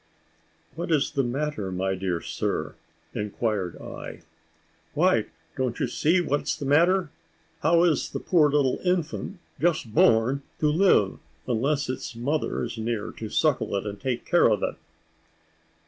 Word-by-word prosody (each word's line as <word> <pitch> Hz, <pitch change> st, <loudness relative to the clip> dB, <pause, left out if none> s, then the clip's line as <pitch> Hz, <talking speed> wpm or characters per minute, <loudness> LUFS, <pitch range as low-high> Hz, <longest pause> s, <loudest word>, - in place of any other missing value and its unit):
"What 170 Hz, +2 st, -5 dB
is 145 Hz, -4 st, +2 dB
the 140 Hz, -2 st, +1 dB
matter, 130 Hz, -5 st, -2 dB
my 95 Hz, +1 st, -1 dB
dear 90 Hz, -3 st, -2 dB
sir?" -, -, -2 dB, 0.4 s
inquired 105 Hz, -3 st, -2 dB
I. -, -, -8 dB, 0.7 s
"Why, -, -, +3 dB, 0.3 s
don't 125 Hz, -2 st, -2 dB
you -, -, +1 dB
see 170 Hz, +5 st, +2 dB
what 145 Hz, -3 st, 0 dB
is -, -, -2 dB
the 145 Hz, -, -5 dB
matter? 170 Hz, +4 st, +3 dB, 0.5 s
How 165 Hz, +2 st, +4 dB
is 165 Hz, -5 st, +2 dB
a -, -, 0 dB
poor 160 Hz, -5 st, +3 dB
little 140 Hz, -3 st, +2 dB
infant, 180 Hz, +1 st, -1 dB, 0.2 s
just 155 Hz, -10 st, 0 dB
born, 115 Hz, +5 st, +4 dB, 0.2 s
to 150 Hz, -1 st, +3 dB
live, 160 Hz, -, +3 dB, 0.3 s
unless 135 Hz, +5 st, 0 dB
its 130 Hz, -2 st, -5 dB
mother 140 Hz, +7 st, -1 dB
is 115 Hz, -, -5 dB
near 110 Hz, -2 st, -2 dB
to 110 Hz, -, -7 dB
suckle 150 Hz, -5 st, +1 dB
it, 100 Hz, -, -2 dB
and 100 Hz, -1 st, -5 dB
take 125 Hz, -2 st, -2 dB
care 175 Hz, -8 st, +4 dB
of 105 Hz, -3 st, +1 dB
it?" -, -, 0 dB
135 Hz, 150 wpm, -26 LUFS, 110-155 Hz, 0.7 s, How